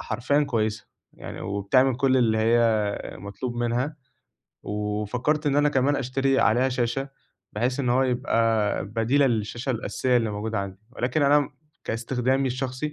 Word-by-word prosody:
حرفيًا 135 +7 0
كويسة 110 -6 -1 0.3
يعني - - -9
وبتعمل 100 +7 +1
كل 130 +1 +2
اللي 115 -3 +2
هي 115 +2 +3 0.6
مطلوب 100 +6 -6
منها، 120 +5 -1 0.7
وفكّرت 105 +9 -2
إن 140 -1 +2
أنا 145 0 +4
كمان 140 +1 +2
أشتري 135 +1 +1
عليها 120 +5 +3
شاشة 125 +2 -1 0.4
بحيث 125 +5 -1
إن 130 - -1
هو 125 +2 +3
يبقى 115 -5 +1
بديلة 115 +7 +2
للشاشة 120 +2 -2
الأساسية 125 +1 0
اللي 115 -3 +1
موجودة 110 +1 -3
عندي، 100 -1 -5
ولكن 125 +4 -1
أنا 145 +1 +5
م 145 0 -4 0.3
كاستخدامي 125 +3 0
الشخصي 130 +3 -3
125 Hz, 145 wpm, -25 LUFS, 110-135 Hz, 0.7 s, أنا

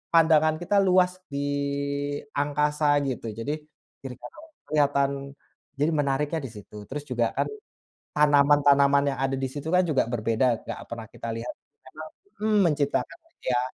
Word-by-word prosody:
pandangan 155 -1 +5
kita 190 +4 0
luas 180 0 +4 0.2
di 140 0 -3 1.0
angkasa 150 +1 +1 0.2
gitu, 125 -3 -4
jadi 115 +6 -2 0.5
kiri-kanan 135 - -10 0.3
kelihatan 140 -2 +2 0.7
jadi 145 +4 +1
menariknya 145 +3 0
di 135 - -6
situ. 105 0 -11
Terus 145 +4 -5
juga, 125 -4 0
kan, - - 0 0.7
tanaman-tanaman 140 -1 +5
yang - - -6
ada 135 0 0
di 135 - -2
situ, 145 +2 -6
kan, 180 +2 +3
juga 145 -8 +1
berbeda, 115 +1 0
nggak - - -6
pernah 115 -1 -6
kita 115 - -7
lihat, 115 +2 -5 0.3
karena, 130 +4 -11 0.4
mhm, 215 0 +2
menciptakan 145 -3 0
itu, 330 - -43
ya, 125 - +3
145 Hz, 145 wpm, -26 LUFS, 130-155 Hz, 1.0 s, pandangan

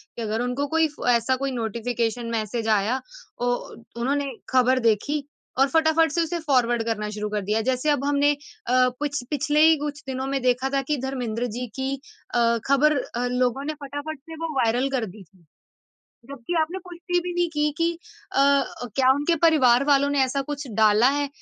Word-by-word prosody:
कि 235 - -6
अगर 220 +1 -2
उनको 250 +4 -1
कोई 320 +2 +2
फ - - -4
ऐसा 240 +2 +3
कोई 275 +1 -2
नोटिफ़िकेशन 235 0 -2
मैसेज़ 225 0 -2
आया 215 +5 +1 0.4
औ 245 0 +2 0.4
उन्होंने 275 +3 -1 0.2
खबर 255 0 +3
देखी 285 +7 +1 0.4
और 270 - +5
फटाफट 320 0 +3
से 340 - +1
उसे 340 +1 -2
फॉरवर्ड 245 -6 +1
करना 215 -2 -2
शुरू 210 0 -4
कर 210 0 -2
दिया। 215 +2 +1
जैसे 255 +4 0
अब 290 -2 +1
हमने 285 0 +3 0.4
अ, 255 +1 +4
पिछ 285 -3 -2
पिछले 295 +1 +1
ही 320 - +6
कुछ 295 0 -5
दिनों 265 0 -3
में 275 0 -1
देखा 250 +1 +1
था 275 - +2
कि 295 - +2
धर्मेंद्र 245 -3 -2
जी 250 - -3
की 265 +1 -2 0.4
अ, 235 -1 +3
खबर 280 +3 +4 0.4
लोगों 250 +2 +1
ने 310 - -2
फटाफट 290 +2 -6
से 325 +3 -11
वो 325 -2 -3
वायरल 245 +2 +2
कर 255 -4 0
दी 200 0 -11
थी। 175 0 -26 0.9
जबकि 280 +4 -5
आपने 330 +4 -1
पुष्टि 355 0 -2
भी 360 - -4
नहीं 350 0 +1
की 300 -1 0
कि 335 0 +2 0.4
अ, - - -1 0.6
क्या 260 -1 +4
उनके 290 +5 +1
परिवार 275 -6 +5
वालों 280 -1 +3
ने 285 -1 +1
ऐसा 275 +2 -1
कुछ 285 +1 -5
डाला 215 +2 +5
है? 285 0 -1
265 Hz, 190 wpm, -24 LUFS, 235-295 Hz, 0.9 s, ही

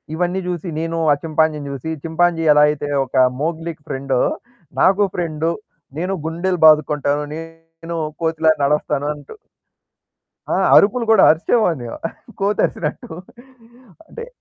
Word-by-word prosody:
ఇవన్నీ 180 +2 -1
జుసి 175 -1 -4
నేను 165 0 -3 0.2
ఆ! - - +1
చింపాంజీని 155 -2 0
జుసి, 140 +4 -5
చింపాంజీ 165 0 +1
ఎలా 150 - +5
అయితే 145 -1 -3 0.2
ఒక 130 - -11 0.3
మోగ్లికి 160 -1 -4
ఫ్రెండో 135 -1 -1 0.6
నాకు 195 +2 +4
ఫ్రెండ్ 165 -2 -2 0.5
నేను 180 +3 -2
గుండెలు 175 +2 -2
బాదుకుంటాను 150 -1 +2
నేను 165 +1 -10 0.3
కోతిలాగా 160 -1 +2
నడుస్తాను 145 0 0
అంటు 145 - -13 1.2
ఆ! - - +1 0.2
అరుపులు 230 +4 +4
కూడా 220 -4 +6
అరిచేవాడిని 160 - +1 0.5
కోతరిసినట్టు 195 -6 -1 1.0
అంటే 465 0 -9
165 Hz, 110 wpm, -19 LUFS, 150-175 Hz, 1.2 s, కూడా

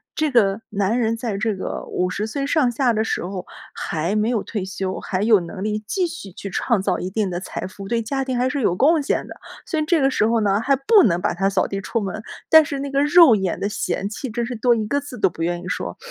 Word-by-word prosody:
这 310 -2 0
个 215 -3 +3
男 205 +4 0
人 225 -1 +1
在 225 -4 -3
这 220 -1 -1
个 185 - -5
50 185 +4 -1
岁 275 +5 -3
上 290 -5 +2
下 245 0 +2
的 220 0 +1
时 - - -2
候 185 -1 -5 0.3
还 165 +6 -2
没 215 +2 +1
有 225 -5 0
退 205 -4 -4
休， 190 -1 -4
还 185 +1 -3
有 215 -2 +5
能 185 +3 -7
力 215 0 -1
继 370 -3 0
续 205 - -8
去 200 - -7
创 215 +2 0
造 190 -2 0
一 180 - -4
定 200 -1 -1
的 175 0 -3
财 185 - -6
富， 195 +1 -10
对 235 +1 0
家 270 +4 -2
庭 255 -2 -2
还 255 +1 +1
是 285 -1 -2
有 180 -5 +2
贡 305 - +4
献 280 - -1
的。 - - -9 0.3
所 320 - -2
以 305 - 0
这 330 -2 +2
个 270 - +4
时 215 - +2
候 230 -1 +2
呢， 200 0 +2
还 275 +3 +3
不 395 - +5
能 175 -3 +1
把 - - 0
他 195 +2 +1
扫 195 -2 +1
地 195 - -4
出 230 +3 -2
门， 200 +2 -4 0.3
但 315 -1 +8
是 280 -1 -4
那 280 0 -4
个 275 +1 +2
肉 295 -5 +7
眼 190 -4 -2
的 200 - -1
嫌 200 -1 -2
弃， 245 +4 -5
真 235 +1 -2
是 245 0 -5
多 240 +1 +3
一 215 -1 -2
个 285 +5 +1
字 275 -3 -9
都 - - +3
不 165 - -10
愿 175 0 -1
意 180 - -8
说。 90 - -4
220 Hz, 285 characters per minute, -21 LUFS, 195-270 Hz, 0.3 s, 但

